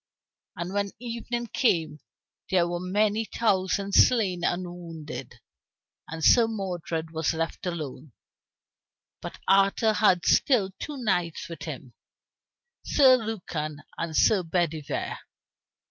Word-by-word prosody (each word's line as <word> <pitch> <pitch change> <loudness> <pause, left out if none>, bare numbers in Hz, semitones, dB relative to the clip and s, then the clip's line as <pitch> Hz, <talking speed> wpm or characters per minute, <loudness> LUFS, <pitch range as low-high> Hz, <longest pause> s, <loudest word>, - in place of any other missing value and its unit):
And 175 +1 -5
when 200 0 0
evening 235 0 -4
came 165 - 0 0.5
there 180 -3 +3
were 175 0 -3
many 205 +4 +1
thousand 200 -3 0
slain 195 -8 +4
and 175 +1 0
wounded, 165 -3 -8 0.7
and 160 0 -6
Sir 235 -2 +6
Modred 175 -6 -4
was 160 0 -1
left 165 +3 -3
alone. 155 -5 -5 1.1
But - - -7
Arthur 195 +3 +4
had 190 -5 +3
still 215 -9 +3
two 295 -2 -5
knights 180 -9 -1
with 165 -1 -9
him, 135 -5 -8 0.9
Sir 265 -3 +6
Lucan 170 -10 -4
and 165 -2 -3
Sir 210 -4 +4
Bedivere. 160 -4 -2
180 Hz, 115 wpm, -26 LUFS, 165-215 Hz, 1.1 s, Sir